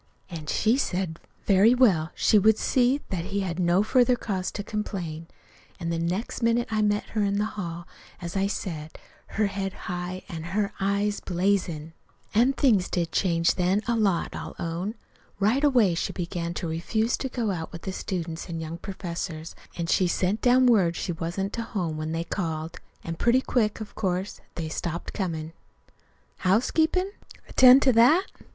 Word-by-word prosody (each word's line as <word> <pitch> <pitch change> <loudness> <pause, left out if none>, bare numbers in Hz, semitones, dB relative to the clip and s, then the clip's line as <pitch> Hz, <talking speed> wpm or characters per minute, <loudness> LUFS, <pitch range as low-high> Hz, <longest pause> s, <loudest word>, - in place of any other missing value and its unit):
An' 160 -3 -7
she 225 +9 +2
said, 180 -8 -2 0.3
very 205 +5 +5
well, 185 -11 +4
she 215 - +4
would 220 +2 +4
see 255 +3 +2
that 175 -3 -2
he 200 +1 -2
had 180 -2 -3
no 175 +2 +3
further 250 +2 +4
cause 190 -6 -3
to 205 - -4
complain. 180 -7 -4 0.5
An' 170 -1 -3
the 165 - -1
next 180 +10 -2
minute 230 +1 +2
I 215 -1 +1
met 205 0 0
her 215 - -1
in 200 0 +1
the 210 - +1
hall, 170 -3 -5 0.3
as 175 +1 -6
I 195 0 +2
just 200 - -1
said, 160 -4 -6 0.4
her 215 - +3
head 195 -1 -3
high 180 -1 -5
an' 165 -5 -6 0.2
her 205 -1 0
eyes 200 +1 0
blazin'. 175 -4 -1 0.4
"An' 240 +5 +4
things 225 -10 +3
did 170 -2 -1
change 170 -3 +2
then, 185 +3 +1
a 235 - +2
lot, 200 -6 +1
I'll - - -6
own. 175 +6 -3 0.4
Right 225 +8 +2
away 245 -10 +4
she 165 - -2
began 170 -1 -4
to 170 - -3
refuse 220 +8 0
to 265 - -3
go 235 -4 -1
out 165 -3 -4
with 170 - -9
the 190 - -4
students 170 -3 -4
an' 165 -1 -4
young 160 +1 -6
professors, 170 -4 -5 0.2
an' 170 - -1
she 180 +2 +2
sent 185 +4 0
down 255 +1 +5
word 195 -9 +4
she 175 - -3
wasn't 175 +5 -3
to 235 - -2
home 180 -8 -3
when 155 +1 -4
they 165 +1 -1
called. 165 -2 -4 0.2
And 165 0 -5
pretty 245 +2 +4
quick, 220 -5 0
of 215 - -8
course, 190 -1 -2
they 165 -2 -3
stopped 170 +2 -4
comin'. 165 -5 -3 0.8
"Housekeepin'? 320 - +2 0.4
Attend 255 +1 +7
to 260 - +4
that? 290 - +5
190 Hz, 180 wpm, -26 LUFS, 170-220 Hz, 0.8 s, Attend